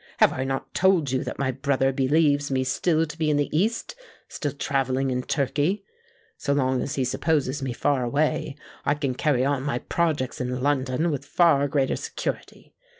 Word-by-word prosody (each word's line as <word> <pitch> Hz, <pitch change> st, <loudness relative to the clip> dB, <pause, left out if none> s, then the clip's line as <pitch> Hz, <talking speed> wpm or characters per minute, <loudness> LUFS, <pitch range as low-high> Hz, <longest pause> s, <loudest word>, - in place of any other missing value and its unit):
"Have -, -, +5 dB
I 130 Hz, -, -2 dB
not 135 Hz, 0 st, -4 dB
told 180 Hz, -7 st, +3 dB
you 130 Hz, -, 0 dB
that -, -, -5 dB
my 135 Hz, -1 st, 0 dB
brother 135 Hz, 0 st, +1 dB
believes 145 Hz, +1 st, +2 dB
me 130 Hz, -1 st, +1 dB
still 160 Hz, +5 st, +1 dB
to 150 Hz, 0 st, -9 dB
be 155 Hz, -1 st, +1 dB
in 150 Hz, -, +2 dB
the 145 Hz, +1 st, -1 dB
East—still 225 Hz, -, -3 dB
travelling 135 Hz, -2 st, 0 dB
in 125 Hz, 0 st, 0 dB
Turkey? 145 Hz, +8 st, 0 dB, 0.5 s
So 140 Hz, -, 0 dB
long 130 Hz, -2 st, +1 dB
as 140 Hz, -, -3 dB
he 135 Hz, -, 0 dB
supposes 145 Hz, +1 st, 0 dB
me 135 Hz, -1 st, -2 dB
far 130 Hz, +2 st, 0 dB
away, 145 Hz, +2 st, 0 dB, 0.3 s
I 145 Hz, -, +2 dB
can 140 Hz, -3 st, -2 dB
carry 130 Hz, -1 st, +1 dB
on 140 Hz, -1 st, +1 dB
my 135 Hz, -3 st, -1 dB
projects 150 Hz, -3 st, -1 dB
in 125 Hz, 0 st, -2 dB
London 145 Hz, +3 st, +1 dB
with 145 Hz, -, -3 dB
far 150 Hz, -5 st, +3 dB
greater 135 Hz, -1 st, 0 dB
security. -, -, -5 dB
140 Hz, 180 wpm, -25 LUFS, 130-150 Hz, 0.5 s, Have